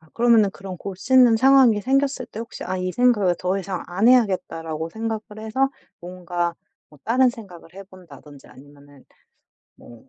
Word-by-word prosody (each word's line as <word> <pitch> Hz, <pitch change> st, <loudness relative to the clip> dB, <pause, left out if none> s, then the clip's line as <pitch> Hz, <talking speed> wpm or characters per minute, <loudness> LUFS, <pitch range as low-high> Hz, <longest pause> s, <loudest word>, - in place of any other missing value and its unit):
아 160 Hz, -, -24 dB
그러면은 230 Hz, -4 st, +3 dB
그런 190 Hz, -1 st, -9 dB
곱씹는 230 Hz, +6 st, +2 dB
상황이 260 Hz, -4 st, +4 dB
생겼을 270 Hz, +1 st, -1 dB
때 -, -, -11 dB
혹시 235 Hz, -, -8 dB
'아 185 Hz, +1 st, -3 dB
이 185 Hz, 0 st, -3 dB
생각을 225 Hz, -8 st, +2 dB
더 185 Hz, +2 st, -1 dB
이상 190 Hz, -1 st, -5 dB
안 195 Hz, +6 st, +1 dB
해야겠다.'라고 165 Hz, -9 st, 0 dB
생각을 220 Hz, 0 st, -4 dB, 0.2 s
해서 225 Hz, +5 st, -1 dB, 0.3 s
뭔가 175 Hz, -1 st, -4 dB, 0.3 s
뭐 150 Hz, -, -20 dB
다른 250 Hz, +2 st, +3 dB
생각을 185 Hz, -8 st, -14 dB
해 195 Hz, -, -9 dB
본다든지 150 Hz, -7 st, -16 dB
아니면은 145 Hz, 0 st, -18 dB, 0.7 s
뭐 120 Hz, +2 st, -17 dB
195 Hz, 340 characters per minute, -22 LUFS, 175-235 Hz, 0.7 s, 상황이